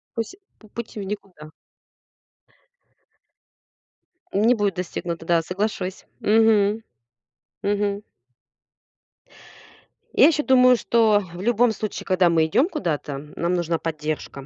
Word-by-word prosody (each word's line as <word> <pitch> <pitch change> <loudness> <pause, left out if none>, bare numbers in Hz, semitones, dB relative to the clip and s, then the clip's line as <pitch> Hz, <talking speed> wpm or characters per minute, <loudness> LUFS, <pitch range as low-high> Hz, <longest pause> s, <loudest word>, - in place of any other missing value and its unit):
Пусь 230 +11 -4 0.2
пу 215 - -18
путь 235 -1 -7
в 210 - -5
никуда. 190 -6 -8 2.8
Не 220 +5 +4
будет 205 -3 0
достигнуто, 170 -2 -5
да, 170 0 +3
соглашусь. 190 +1 -3 0.2
Мгм. 220 0 +3 0.8
Мгм. 205 0 -1 2.1
Я - - +6
ещё 305 -2 +1
думаю, 255 -1 +6
что 220 -3 +3
в 175 - -8
любом 240 +2 +3
случае, 215 0 -5
когда 185 -2 +3
мы 160 -1 +3
идём 255 - +2
куда-то, 150 - -3 0.2
нам 170 +1 -1
нужна 170 -2 0
поддержка. 155 -3 -5
200 Hz, 110 wpm, -23 LUFS, 170-225 Hz, 2.8 s, Я